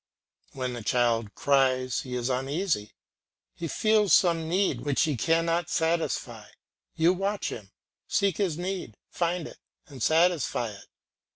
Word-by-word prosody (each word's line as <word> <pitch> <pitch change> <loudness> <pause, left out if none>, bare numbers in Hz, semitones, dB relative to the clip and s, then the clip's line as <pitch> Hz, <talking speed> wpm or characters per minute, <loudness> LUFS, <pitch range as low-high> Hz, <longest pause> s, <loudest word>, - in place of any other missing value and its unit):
When 130 -2 -3
the 120 - -6
child 115 -2 +1
cries 130 -3 +2
he 125 -1 -5
is 120 -1 -1
uneasy, 135 - -1 0.6
he 170 - -5
feels 215 +3 +2
some 165 -3 +2
need 190 +3 +1
which 145 -2 +1
he 150 -3 0
cannot 165 +5 +1
satisfy; 165 0 -1 0.5
you 165 +3 +4
watch 195 +2 -2
him, 105 -4 -8 0.4
seek 195 -4 +1
this 185 -6 0
need, 180 - -4
find 170 -1 -1
it, - - -13 0.3
and 140 -7 -12
satisfy 160 -7 +2
it. 100 - -13
160 Hz, 135 wpm, -27 LUFS, 125-175 Hz, 0.6 s, you